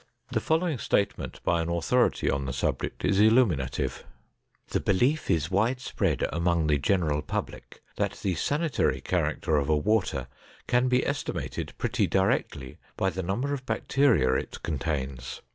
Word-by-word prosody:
The 120 - +1
following 160 +1 0
statement 100 - -1
by 85 - +2
an 80 - -3
authority 115 +9 +1
on 70 -1 0
the 65 - -3
subject 65 - -2
is 95 +1 +2
illuminative: 105 - +2 0.7
"The - - 0
belief 125 +11 +1
is 80 +1 +1
widespread 115 +7 0
among 85 0 +1
the 75 -2 +2
general 75 -2 +1
public - - -6
that - - 0
the 95 - -2
sanitary 145 - 0
character 80 - 0
of 70 0 0
a 75 - +4
water 95 - 0 0.4
can 125 +1 +2
be 125 0 +2
estimated 140 +1 -3
pretty - - 0
directly 65 -2 0 0.2
by 95 - +1
the 95 +2 -3
number 110 +11 -1
of 135 -2 -4
bacteria 125 - +2
it - - -3
contains. 70 -5 -3
95 Hz, 145 wpm, -27 LUFS, 75-125 Hz, 0.7 s, a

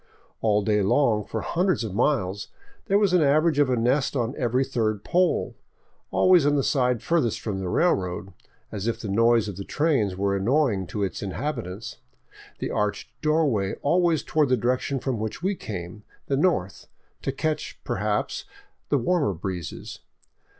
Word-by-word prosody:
All 105 -2 +2
day 105 0 +2
long, 105 +1 +2
for 110 +2 -4
hundreds 180 -4 0
of 105 -4 -4
miles, 100 -5 0 0.4
there 200 -1 +4
was 205 -3 +2
an 180 - +5
average 155 +1 +3
of 145 -3 +4
a 125 - +2
nest 130 +5 +1
on 120 -1 0
every 130 -1 +1
third 110 -5 -1
pole, 180 +1 +1 0.6
always 180 -4 +5
on 145 +1 +3
the 140 - +2
side 125 -4 +1
farthest 160 -10 +1
from 100 -4 -3
the 95 -2 -3
railroad, 95 - 0 0.4
as 105 +1 -4
if 115 - -1
the 110 - -5
noise 115 +2 +3
of 100 -3 -6
the 100 - -5
trains 135 - +1
were 100 +1 0
annoying 105 - +1
to 105 +2 -3
its 95 - -3
inhabitants, 100 - -4 0.6
the - - -4
arched 105 0 -2
doorway 150 -11 +1
always 170 0 +2
toward 150 -3 +1
the 130 - +3
direction 125 +4 0
from 125 -3 -2
which 110 +9 -4
we 195 +2 +1
came 95 - -7
— - - -37
the 140 - +2
north 135 - 0 0.2
— - - -42
to - - -1
catch, 155 +3 -3
perhaps, - - -2 0.4
the 145 - +3
warmer 140 - +1
breezes. 90 0 -6
120 Hz, 170 wpm, -25 LUFS, 100-150 Hz, 0.6 s, an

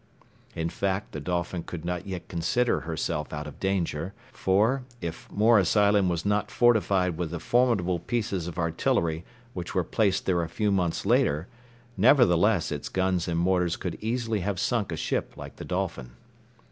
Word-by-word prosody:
In 80 0 -1
fact, 95 +2 -2
the 75 - -5
Dolphin 85 +2 -2
could 85 0 -7
not 90 +2 -3
yet 95 -2 -5
consider 100 +9 +1
herself 80 -2 -3
out 75 0 -4
of 75 - -10
danger; 95 -2 -1 0.2
for, 110 +4 +2 0.2
if 85 -5 -7
Morris 105 -3 +4
Island 100 -2 +4
was 85 0 -2
not 105 0 +1
fortified 100 -7 +2
with 85 -2 -1
the 85 +1 -4
formidable 100 -6 +2
pieces 100 -3 -2
of 85 - -7
artillery 85 -1 0 0.3
which 90 +1 -6
were 90 - +2
placed 100 +2 +1
there 90 -2 +2
a 85 - -3
few 105 +4 0
months 90 -4 0
later, 75 +5 +2 0.5
nevertheless 105 - +4
its 75 - -4
guns 95 -2 0
and 85 -1 -1
mortars 90 0 +2
could 90 -3 -4
easily 115 -1 -1
have 95 0 -2
sunk 115 -5 0
a - - -3
ship - - -2
like - - -9
the - - -7
Dolphin. 60 - -3
90 Hz, 170 wpm, -27 LUFS, 85-105 Hz, 0.5 s, Morris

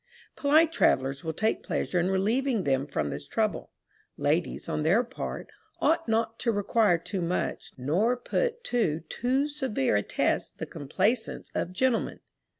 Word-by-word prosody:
Polite 310 +3 +4
travellers 135 - +2
will 160 - -2
take 215 +7 0
pleasure 180 - -1
in 175 +2 +1
relieving 220 +4 +1
them 135 0 +1
from 75 - -2
this - - -6
trouble. - - -1 0.5
Ladies, 65 +4 0
on - - -1
their 180 +10 +4
part, 255 +2 -6 0.3
ought 330 -2 +2
not 225 0 0
to 235 - +1
require 205 -2 +3
too 185 +3 -4
much, 175 +1 -2
nor 180 - +1
put 475 - -1
to 190 - 0
too 260 +4 +1
severe 260 - 0
a - - +2
test - - -1
the - - -4
complaisance 200 - -1
of 175 - -2
gentlemen. 240 +5 0
215 Hz, 150 wpm, -28 LUFS, 160-250 Hz, 0.5 s, Polite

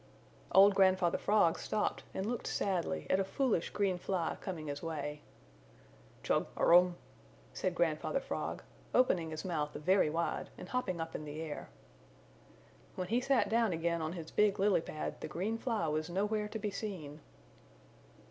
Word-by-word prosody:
Old 200 +1 +8
Grandfather 185 -3 +3
Frog 205 -6 +3
stopped 210 - -1
and 190 - -3
looked 240 +2 -3
sadly 170 - -1
at 185 - +4
a - - +3
foolish 210 -2 0
green 195 -3 0
fly 175 -3 -1
coming 170 -5 -5
his 145 -1 -4
way. 150 -2 -4 1.0
"Chug - - +1
arum," 175 +1 +6 0.6
said - - -1
Grandfather - - +1
Frog, - - -4 0.3
opening 180 -10 +3
his 155 +2 -6
mouth 150 -5 -2
very 185 +1 +3
wide 165 +2 -2
and 180 - -9
hopping 200 -9 -1
up 165 0 -4
in - - -5
the 150 +1 -6
air. 160 - -6 1.3
When 180 -1 -4
he 240 +3 +2
sat 270 0 +2
down 225 -3 +2
again 170 0 0
on 160 +1 -2
his 165 -3 -7
big 210 -1 +3
lily 200 -3 +3
pad 155 -1 -5
the - - -4
green 215 +6 -2
fly 225 -10 -1
was 155 +2 -1
nowhere 210 +4 0
to 215 - -5
be 210 -1 -3
seen. 175 -8 -6
185 Hz, 160 wpm, -33 LUFS, 160-210 Hz, 1.3 s, Old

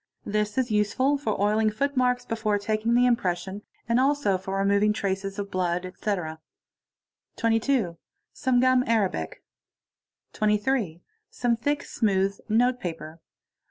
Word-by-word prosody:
This 210 +1 -1
is 250 -3 0
useful 235 +7 +2
for 220 -7 -2
oiling 215 +2 +2
footmarks 250 +1 0
before 220 -2 0
'taking 215 +3 0
the 245 +1 +5
impression 195 -4 0 0.3
and 235 +2 +2
also 275 -6 +2
for 190 +1 -4
removing 200 +2 +3
traces 195 0 -3
of 200 -1 -5
blood, 180 -1 -1
etc. 180 -4 -3 1.0
22. 225 -5 +1 0.4
Some.gum 255 0 +3
arabic. 200 - -1 0.9
23. 210 -4 0 0.3
Some 240 -1 0
thick, 285 +5 -1
smooth 195 -3 0
notepaper. 190 -9 0
210 Hz, 115 wpm, -26 LUFS, 195-245 Hz, 1.0 s, the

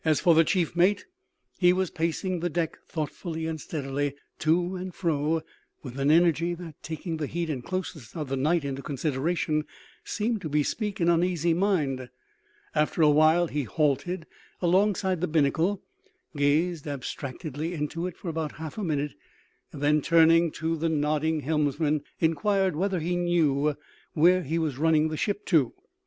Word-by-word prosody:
As 155 -2 +3
for 170 - +5
the 165 +1 +6
chief 175 -1 0
mate, 185 +4 +3 0.5
he 180 -1 +6
was 185 -1 0
pacing 170 +3 -1
the 175 +1 -1
deck 165 0 -2
thoughtfully 160 +1 -4
and 160 -2 -3
steadily 140 -1 -3 0.2
to 175 +4 +1
and 185 0 -6
fro 160 -2 0 0.4
with 130 -1 -7
an 135 +1 +2
energy 170 +1 +3
that, 170 -2 -9
taking 160 +1 -4
the 150 -2 -2
heat 170 +1 -2
and 130 -4 -4
closeness 175 - -5
of 155 -4 -3
the 135 - -2
night 150 +4 +1
into 135 0 -3
consideration, 150 +3 -1 0.4
seemed 220 0 -2
to 155 - -4
bespeak 190 +8 -1
an 170 - +2
uneasy 170 -1 +2
mind. 150 -9 0 0.6
After 150 +2 +1
a 150 - +6
while 155 +3 +5
he 150 -3 -2
halted 155 - 0 0.3
alongside 190 0 +2
the 180 - +1
binnacle, 165 +5 +1 0.5
gazed 150 +3 +1
abstractedly 145 +3 -5
into 165 +3 -3
it 180 - -8
for - - -9
about 160 -2 -3
half 160 +6 -7
a - - -2
minute, 150 -4 -1 0.6
and 145 - -7
then, 150 +1 +3
turning 165 +2 +5
to 165 +1 -1
the 165 +1 0
nodding 155 +1 0
helmsman, 150 0 0 0.2
inquired 185 +3 +1
whether 190 +2 0
he 175 +3 -1
knew 155 -5 +2 0.4
where 180 +4 +5
he 165 0 -2
was 155 -5 -1
running 160 0 +3
the 155 - -3
ship 205 +3 -2
to. 150 -9 +2
160 Hz, 165 wpm, -27 LUFS, 150-175 Hz, 0.6 s, the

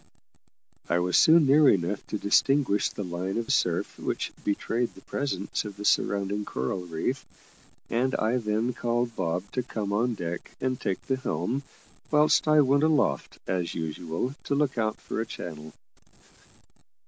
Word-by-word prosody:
I 85 - +3
was 90 +1 +1
soon 160 -1 +7
near 140 +1 +6
enough 95 +2 +1
to 105 - -2
distinguish 115 +1 +3
the 105 - -5
line 90 +2 -3
of 115 -1 0
surf - - 0
which - - -2
betrayed 115 +4 -1
the - - -13
presence 135 -9 -2
of 105 -2 -8
the 105 - -6
surrounding 100 +1 +1
coral 90 +5 -3
reef, 85 +11 -2 0.6
and 130 +3 0
I 115 +3 +1
then 110 +1 0
called 120 0 -1
Bob 90 +1 -2
to 130 - -1
come 105 -4 -4
on 115 +3 +1
deck 85 -2 -5
and 130 -1 -1
take 95 -2 -2
the 130 - -1
helm, 115 - -2 0.5
whilst 150 +1 +4
I 155 0 +6
went 140 +1 +3
aloft, 150 - +1
as 90 -2 -2
usual, 80 - -3
to 140 - 0
look 140 -2 +1
out 110 -2 -1
for - - -3
a - - -2
channel. 80 -6 -7
110 Hz, 160 wpm, -27 LUFS, 90-130 Hz, 0.6 s, soon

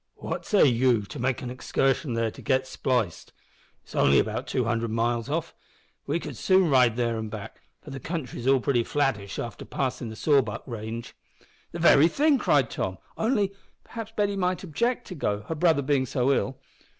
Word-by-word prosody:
What - - -5
say 205 - +5
ye 125 -3 +3
to 145 +7 -9
make 130 +1 -1
an 125 - -4
excursion 130 0 0
there 115 -1 0
to - - -12
get 130 -1 +1
spliced, 125 - -2 0.5
it's - - -16
only 70 - +4
about - - 0
two 125 - 0
hundred 115 0 -1
miles 115 +2 -1
off? 165 +3 -2 0.5
We - - 0
could - - -7
soon 185 -4 +3
ride 125 -4 +5
there 115 -1 0
an' 110 -1 -4
back, 110 0 -8 0.2
for 150 - -10
the 135 - -6
country's 135 -5 -5
all 135 0 +5
pretty 120 -2 +1
flattish 125 -8 -1
after 115 -3 -5
passin' 130 -3 -3
the 110 - -8
Sawback 135 -7 +1
range." 115 0 -6 0.6
"The - - -6
very 160 -2 +6
thing!" 285 - +3
cried - - +2
Tom; - - -3 0.2
"only 210 -4 +1 0.3
perhaps 225 -2 -7
Betty 205 -1 +1
might 185 -1 -1
object 235 - -1
to - - -5
go, 105 - -2
her 160 - -5
brother 160 -2 +2
being 130 -1 +1
so 130 +2 +1
ill." 135 0 -1
130 Hz, 185 wpm, -26 LUFS, 115-160 Hz, 0.6 s, very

